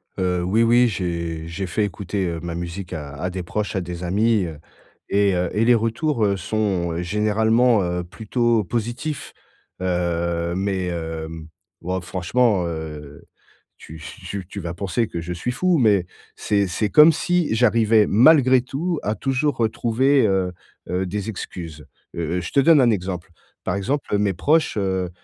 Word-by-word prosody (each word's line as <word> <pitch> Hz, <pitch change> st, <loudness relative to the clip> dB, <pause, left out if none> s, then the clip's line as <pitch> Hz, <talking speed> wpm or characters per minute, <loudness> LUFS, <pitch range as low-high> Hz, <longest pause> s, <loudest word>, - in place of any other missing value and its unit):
Heu, 90 Hz, -1 st, 0 dB
oui, 105 Hz, +6 st, +2 dB
oui. 120 Hz, +2 st, +5 dB
J'ai 85 Hz, -5 st, -3 dB
j'ai 90 Hz, +3 st, -4 dB
fait 105 Hz, +5 st, 0 dB
écouter, 100 Hz, 0 st, -3 dB
heu, 85 Hz, -1 st, -3 dB
ma 85 Hz, -1 st, -5 dB
musique 85 Hz, +1 st, -6 dB
à 75 Hz, -3 st, -6 dB
à 90 Hz, -, -1 dB
des 90 Hz, 0 st, -5 dB
proches, 105 Hz, +5 st, -3 dB
à 95 Hz, -, 0 dB
des 90 Hz, 0 st, -6 dB
amis. 105 Hz, +3 st, +2 dB
Heu 80 Hz, -3 st, -7 dB, 0.5 s
et 100 Hz, -1 st, +3 dB
heu, 90 Hz, -1 st, 0 dB
et 110 Hz, -, +2 dB
les 120 Hz, +1 st, +6 dB
retours, 115 Hz, +2 st, 0 dB
heu, 100 Hz, -1 st, +2 dB
sont 90 Hz, -4 st, -1 dB
généralement, 110 Hz, +4 st, +2 dB
heu, 90 Hz, 0 st, -2 dB
plutôt 115 Hz, +4 st, 0 dB
positifs. 120 Hz, -, -4 dB, 0.5 s
Heu, 85 Hz, -1 st, -1 dB
mais 95 Hz, -1 st, -1 dB
hem 80 Hz, -1 st, -5 dB, 0.3 s
ouais, 90 Hz, +2 st, -2 dB
franchement, 95 Hz, +3 st, +1 dB
heu, 75 Hz, -3 st, -7 dB, 0.6 s
tu 80 Hz, +1 st, -12 dB, 0.2 s
tu 100 Hz, -2 st, -5 dB
tu 100 Hz, -, -7 dB
vas 85 Hz, -3 st, -5 dB
penser 100 Hz, +5 st, -1 dB
que 85 Hz, -, -5 dB
je 90 Hz, +2 st, -5 dB
suis 90 Hz, +8 st, -3 dB
fou, 180 Hz, +6 st, +1 dB
mais 105 Hz, -, +3 dB, 0.3 s
c'est 100 Hz, -2 st, 0 dB
c'est 105 Hz, +4 st, -1 dB
comme 150 Hz, +10 st, +8 dB
si 175 Hz, -3 st, 0 dB
j'arrivais 115 Hz, -2 st, +4 dB
malgré 130 Hz, +2 st, +5 dB
tout, 155 Hz, +6 st, -3 dB
à 105 Hz, -, 0 dB
toujours 135 Hz, +4 st, -1 dB
retrouver, 120 Hz, +4 st, +2 dB
heu 95 Hz, -2 st, +1 dB, 0.4 s
heu, 90 Hz, +1 st, -1 dB
des 100 Hz, +3 st, -4 dB
excuses. 85 Hz, -6 st, -7 dB, 0.3 s
Heu 85 Hz, +1 st, -2 dB
heu, -, -, -1 dB
je 85 Hz, -, -6 dB
te -, -, +3 dB
donne 150 Hz, +1 st, +6 dB
un 125 Hz, -, +4 dB
exemple. 90 Hz, -3 st, -3 dB, 0.3 s
Par 90 Hz, -, -1 dB
exemple, 110 Hz, +2 st, -1 dB
mes 100 Hz, -1 st, +1 dB
proches, 155 Hz, -, +1 dB
heu, 95 Hz, -2 st, -1 dB
100 Hz, 170 wpm, -22 LUFS, 85-115 Hz, 0.6 s, comme